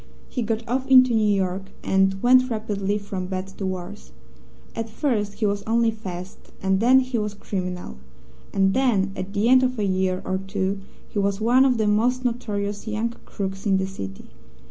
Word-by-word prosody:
He 250 Hz, -, -3 dB
got 225 Hz, +1 st, -2 dB
off 260 Hz, +3 st, -1 dB
into 255 Hz, -2 st, +7 dB
New 215 Hz, -2 st, +3 dB
York, 190 Hz, 0 st, -1 dB, 0.2 s
and 195 Hz, 0 st, +2 dB
went 255 Hz, +1 st, +5 dB
rapidly 210 Hz, -3 st, -1 dB
from 195 Hz, -3 st, -5 dB
bad 185 Hz, 0 st, -3 dB
to 195 Hz, -, -1 dB
worse. 175 Hz, -, -6 dB, 0.6 s
At 225 Hz, 0 st, -3 dB
first 215 Hz, -4 st, -1 dB
he 215 Hz, +1 st, -2 dB
was 200 Hz, 0 st, 0 dB
only 230 Hz, 0 st, +3 dB
fast, 185 Hz, -4 st, -7 dB, 0.2 s
and 190 Hz, 0 st, +1 dB
then 255 Hz, +4 st, +6 dB
he 255 Hz, -2 st, -2 dB
was 210 Hz, -1 st, -3 dB
criminal; 180 Hz, -, -5 dB, 0.5 s
and 195 Hz, -1 st, +2 dB
then, 230 Hz, -7 st, +2 dB
at 185 Hz, 0 st, -5 dB
the 205 Hz, +2 st, +1 dB
end 255 Hz, +1 st, +6 dB
of 255 Hz, -1 st, 0 dB
a 210 Hz, -, 0 dB
year 185 Hz, -1 st, 0 dB
or 190 Hz, 0 st, -1 dB
two, 195 Hz, 0 st, -2 dB, 0.3 s
he 205 Hz, -, -3 dB
was 200 Hz, 0 st, 0 dB
one 245 Hz, +4 st, +4 dB
of 255 Hz, -3 st, +3 dB
the 220 Hz, -, +1 dB
most 240 Hz, +5 st, +2 dB
notorious 210 Hz, -4 st, -2 dB
young 220 Hz, +2 st, -1 dB
crooks 195 Hz, +1 st, -4 dB
in 195 Hz, -1 st, +4 dB
the 190 Hz, -, 0 dB
city. 95 Hz, -, -7 dB
205 Hz, 190 wpm, -24 LUFS, 190-235 Hz, 0.6 s, into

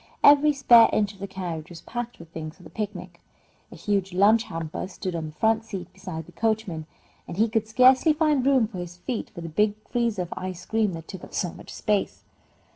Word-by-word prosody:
Every 290 Hz, +1 st, +7 dB
spare 245 Hz, -5 st, +7 dB
inch 205 Hz, -1 st, +1 dB
of 195 Hz, -, -19 dB
the 200 Hz, -, -5 dB
carriage 175 Hz, -4 st, -5 dB
was 170 Hz, -2 st, -10 dB
packed 240 Hz, 0 st, -5 dB
with 165 Hz, -1 st, -13 dB
things 155 Hz, -1 st, -7 dB
for 180 Hz, -, -17 dB
the 160 Hz, -, -13 dB
picnic. 185 Hz, -5 st, -6 dB, 0.5 s
A -, -, -10 dB
huge 195 Hz, +2 st, -1 dB
lunch 215 Hz, +5 st, +4 dB
hamper 165 Hz, +1 st, -5 dB
stood 185 Hz, -1 st, -5 dB
on 160 Hz, -2 st, -3 dB
the -, -, -8 dB
front 220 Hz, +3 st, +2 dB
seat 190 Hz, -5 st, -7 dB
beside 160 Hz, -5 st, -7 dB
the 175 Hz, -, -15 dB
coachman, 205 Hz, -5 st, -1 dB, 0.4 s
and -, -, -7 dB
he 220 Hz, +2 st, +4 dB
could 220 Hz, -1 st, -1 dB
scarcely 255 Hz, +7 st, +5 dB
find 300 Hz, -4 st, +2 dB
room 265 Hz, -4 st, +4 dB
for 200 Hz, -5 st, -8 dB
his 175 Hz, 0 st, -7 dB
feet 235 Hz, +6 st, -4 dB
for 175 Hz, -, -9 dB
the 165 Hz, -, -5 dB
big 210 Hz, +6 st, +2 dB, 0.2 s
freezer 235 Hz, -6 st, 0 dB
of 175 Hz, -, -7 dB
ice 185 Hz, -1 st, -6 dB
cream 220 Hz, -2 st, +1 dB
that 165 Hz, -1 st, -8 dB
took 190 Hz, -, -9 dB
up -, -, -10 dB
so 175 Hz, -3 st, -1 dB
much -, -, -12 dB
space. 210 Hz, -2 st, -1 dB
200 Hz, 220 wpm, -25 LUFS, 175-225 Hz, 0.5 s, Every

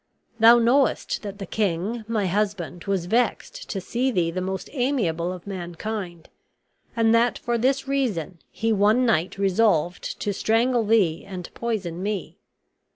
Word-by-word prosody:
Thou 230 Hz, +2 st, +8 dB
knowest 245 Hz, +3 st, +2 dB
that 200 Hz, -2 st, -7 dB
the 200 Hz, -, -6 dB
king, 205 Hz, +4 st, -1 dB
my 220 Hz, -3 st, 0 dB
husband, 185 Hz, -3 st, -2 dB
was 195 Hz, -3 st, -1 dB
vexed 245 Hz, -, -1 dB
to 195 Hz, -, -2 dB
see 245 Hz, +7 st, -1 dB
thee 175 Hz, -8 st, 0 dB
the 185 Hz, +2 st, -3 dB
most 190 Hz, +1 st, -4 dB
amiable 215 Hz, -, 0 dB
of 180 Hz, -2 st, -8 dB
mankind; 180 Hz, -1 st, -6 dB, 0.7 s
and 225 Hz, -1 st, +3 dB
that 235 Hz, +1 st, +3 dB
for 240 Hz, 0 st, -2 dB
this 265 Hz, +4 st, +1 dB
reason 210 Hz, -, -1 dB
he 225 Hz, 0 st, -1 dB
one 215 Hz, +5 st, +3 dB
night 195 Hz, -5 st, +1 dB
resolved 190 Hz, -3 st, +1 dB
to 205 Hz, -, -1 dB
strangle 230 Hz, +4 st, +2 dB
thee 195 Hz, -8 st, +2 dB
and 185 Hz, -3 st, -8 dB
poison 195 Hz, -7 st, -3 dB
me. 205 Hz, -2 st, -4 dB
205 Hz, 150 wpm, -24 LUFS, 180-230 Hz, 0.7 s, Thou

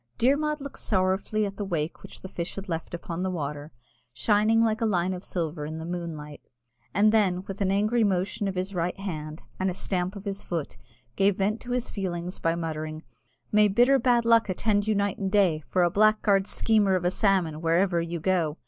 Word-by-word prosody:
Dermod 300 Hz, +4 st, +2 dB
looked 280 Hz, -1 st, -8 dB
sorrowfully 190 Hz, +2 st, 0 dB
at 200 Hz, 0 st, -6 dB
the 205 Hz, -, -2 dB
wake 165 Hz, -5 st, -3 dB
which -, -, -12 dB
the -, -, -7 dB
fish 170 Hz, -2 st, -5 dB
had 195 Hz, +1 st, -7 dB
left 165 Hz, 0 st, -4 dB
upon 170 Hz, 0 st, -5 dB
the 190 Hz, -, 0 dB
water, 150 Hz, -3 st, -4 dB, 0.4 s
shining 215 Hz, -, +3 dB
like 220 Hz, 0 st, 0 dB
a -, -, +2 dB
line 185 Hz, -2 st, +1 dB
of 180 Hz, +1 st, -7 dB
silver 165 Hz, -3 st, -3 dB
in 155 Hz, +2 st, -5 dB
the 160 Hz, -, -6 dB
moonlight, 165 Hz, -4 st, -6 dB, 0.5 s
and 210 Hz, +2 st, +4 dB
then, 190 Hz, -5 st, +2 dB
with 195 Hz, 0 st, -7 dB
an 195 Hz, -, +2 dB
angry 215 Hz, +4 st, +2 dB
motion 195 Hz, +1 st, 0 dB
of 190 Hz, -, -3 dB
his 185 Hz, +2 st, -3 dB
right 180 Hz, +1 st, -2 dB
hand, 155 Hz, -5 st, -6 dB, 0.2 s
and 190 Hz, 0 st, +1 dB
a 180 Hz, -, -4 dB
stamp 185 Hz, 0 st, -2 dB
of 200 Hz, +1 st, -9 dB
his 200 Hz, 0 st, -3 dB
foot, 165 Hz, -5 st, -4 dB, 0.4 s
gave 195 Hz, 0 st, +3 dB
vent 210 Hz, +3 st, 0 dB
to 250 Hz, -, -10 dB
his 245 Hz, -1 st, -1 dB
feelings 180 Hz, -2 st, -4 dB
by 165 Hz, 0 st, +1 dB
muttering, 155 Hz, -1 st, -4 dB, 0.5 s
"May 210 Hz, 0 st, +5 dB
bitter 245 Hz, +7 st, +4 dB
bad 240 Hz, -1 st, +3 dB
luck 230 Hz, -2 st, +4 dB
attend 205 Hz, +2 st, +1 dB
you 215 Hz, -, +2 dB
night 200 Hz, -1 st, 0 dB
and 195 Hz, -2 st, -2 dB
day 185 Hz, -7 st, +3 dB
for 185 Hz, -, +2 dB
a 175 Hz, -, +2 dB
blackguard 210 Hz, -1 st, +3 dB
schemer 210 Hz, -4 st, +2 dB
of 180 Hz, -1 st, -1 dB
a 180 Hz, -, +3 dB
salmon, 185 Hz, -6 st, +1 dB
wherever 170 Hz, +1 st, +2 dB
you 170 Hz, 0 st, -4 dB
go! 165 Hz, -3 st, 0 dB
190 Hz, 210 wpm, -26 LUFS, 170-210 Hz, 0.5 s, May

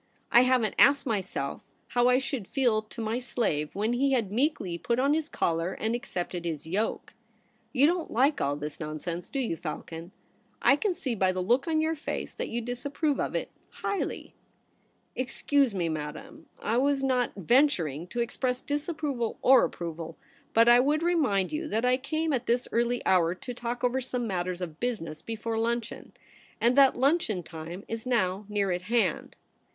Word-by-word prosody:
I 240 Hz, -, +8 dB
haven't 255 Hz, -4 st, +2 dB
asked 280 Hz, 0 st, +6 dB
myself 195 Hz, -, -2 dB, 0.3 s
how 245 Hz, 0 st, +3 dB
I 250 Hz, -, +5 dB
should 270 Hz, -6 st, -3 dB
feel 240 Hz, -6 st, +2 dB
to 215 Hz, +1 st, -9 dB
my 225 Hz, +2 st, -1 dB
slave 195 Hz, -12 st, -1 dB
when 215 Hz, +4 st, 0 dB
he 270 Hz, +2 st, +2 dB
had 225 Hz, -7 st, 0 dB
meekly 220 Hz, -, 0 dB
put 235 Hz, +6 st, 0 dB
on 275 Hz, +3 st, +3 dB
his 315 Hz, 0 st, -1 dB
collar 165 Hz, +2 st, 0 dB
and 220 Hz, +3 st, -2 dB
accepted 180 Hz, -8 st, -4 dB
his 160 Hz, -4 st, -4 dB
yoke. 195 Hz, +7 st, -2 dB, 0.6 s
You 260 Hz, +4 st, +4 dB
don't 345 Hz, +1 st, +1 dB
like 275 Hz, +6 st, +2 dB
all 140 Hz, -, +1 dB
this 150 Hz, +1 st, -6 dB
nonsense, 160 Hz, +3 st, -5 dB
do -, -, -4 dB
you, 245 Hz, -10 st, -1 dB
Falcon? 165 Hz, +2 st, -7 dB, 0.5 s
I 275 Hz, -, +5 dB
can 370 Hz, +4 st, -1 dB
see 260 Hz, -6 st, -3 dB
by 190 Hz, -4 st, +2 dB
the 185 Hz, -, -3 dB
look 245 Hz, -, +2 dB
on 315 Hz, -1 st, +2 dB
your 320 Hz, +1 st, +1 dB
face 315 Hz, 0 st, -4 dB
that -, -, -4 dB
you 235 Hz, +1 st, -2 dB
disapprove 280 Hz, +5 st, -2 dB
of -, -, -2 dB
it -, -, -2 dB, 0.2 s
highly 400 Hz, -, -4 dB, 0.3 s
!' -, -, -41 dB
* -, -, -42 dB
Excuse 260 Hz, -1 st, +1 dB
me, 175 Hz, -3 st, 0 dB
Madame. 160 Hz, -, -6 dB
I 225 Hz, -, 0 dB
was 275 Hz, +1 st, +2 dB
not 255 Hz, -2 st, +1 dB
ventur 235 Hz, -, +3 dB
ing 160 Hz, +5 st, -7 dB
to 240 Hz, +5 st, -2 dB
express 250 Hz, +1 st, -1 dB
disapproval 290 Hz, -5 st, -2 dB
or 265 Hz, 0 st, +7 dB
approval; 165 Hz, -1 st, -6 dB, 0.4 s
but 230 Hz, +1 st, +6 dB
I 240 Hz, 0 st, +8 dB
would 295 Hz, +5 st, +2 dB
remind 275 Hz, -, +2 dB
you 310 Hz, +1 st, -3 dB
that 225 Hz, -2 st, 0 dB
I 250 Hz, 0 st, +4 dB
came 315 Hz, +4 st, -1 dB
at 250 Hz, -2 st, -1 dB
this 245 Hz, +1 st, +1 dB
early 240 Hz, +1 st, 0 dB
hour 175 Hz, -2 st, +3 dB
to 245 Hz, +6 st, -7 dB
talk 240 Hz, 0 st, -4 dB
over 250 Hz, +1 st, +1 dB
some 250 Hz, -1 st, -3 dB
matters 180 Hz, -3 st, -2 dB
of 165 Hz, -3 st, -6 dB
business 200 Hz, -11 st, -3 dB
before 225 Hz, 0 st, -3 dB
luncheon 235 Hz, 0 st, -3 dB, 0.2 s
— -, -, -28 dB
and 240 Hz, +2 st, +3 dB
that 275 Hz, -1 st, +6 dB
luncheon 260 Hz, -, +1 dB
time 165 Hz, +4 st, -8 dB
is 225 Hz, +2 st, -5 dB
now 200 Hz, -4 st, 0 dB
near 200 Hz, -2 st, 0 dB
at 175 Hz, 0 st, -1 dB
hand.' 235 Hz, -1 st, +1 dB
235 Hz, 190 wpm, -28 LUFS, 185-270 Hz, 0.6 s, I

